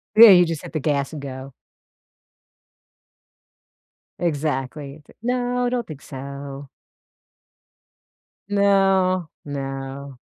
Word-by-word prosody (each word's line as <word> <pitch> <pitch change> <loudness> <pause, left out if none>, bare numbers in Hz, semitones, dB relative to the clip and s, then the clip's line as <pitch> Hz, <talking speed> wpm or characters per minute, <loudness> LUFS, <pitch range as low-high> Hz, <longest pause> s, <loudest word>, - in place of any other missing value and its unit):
Yeah, 225 +1 +11
you 180 -2 +8
just 165 -3 -3
hit - - -10
the 155 - -1
gas 140 -1 0
and 150 - -6
go. 135 -1 -8 2.7
Exactly. 145 -2 -2
T - - -19
no, 245 0 0
I - - +1
don't 245 -1 -2
think 150 -3 -9
so. 140 0 -8 1.8
No, 195 -3 +3 0.2
no. 135 -1 -6
150 Hz, 100 wpm, -22 LUFS, 140-195 Hz, 2.7 s, Yeah